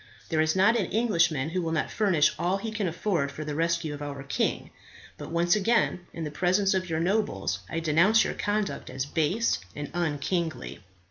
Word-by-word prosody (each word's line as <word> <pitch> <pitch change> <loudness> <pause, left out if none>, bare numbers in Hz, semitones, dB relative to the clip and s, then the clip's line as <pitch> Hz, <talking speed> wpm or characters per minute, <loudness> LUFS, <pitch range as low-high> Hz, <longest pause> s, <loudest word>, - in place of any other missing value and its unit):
There 160 -2 +2
is 155 +1 +1
not 195 +5 +4
an 190 - -1
Englishman 175 - +1
who 180 +2 -1
will 165 -1 -2
not 160 - -1
furnish 190 -9 +3
all 180 +3 +1
he 220 +2 -5
can 215 -3 -1
afford 170 -4 -1
for 155 +2 -7
the 150 - -3
rescue 165 0 0
of 145 - -8
our 140 -2 -5
king. 140 - -2 0.4
But - - -8
once 170 +3 +2
again, 210 -4 +1
in 165 - -6
the 150 - -4
presence 185 +5 +2
of 185 -1 -1
your 160 -1 -1
nobles, 165 - 0
I 165 - -2
denounce 170 +8 +4
your - - -2
conduct 205 0 -2
as 130 0 -3
base 160 - 0 0.2
and 145 -1 -6
unkingly." 160 -3 -2
170 Hz, 195 wpm, -27 LUFS, 150-195 Hz, 0.4 s, not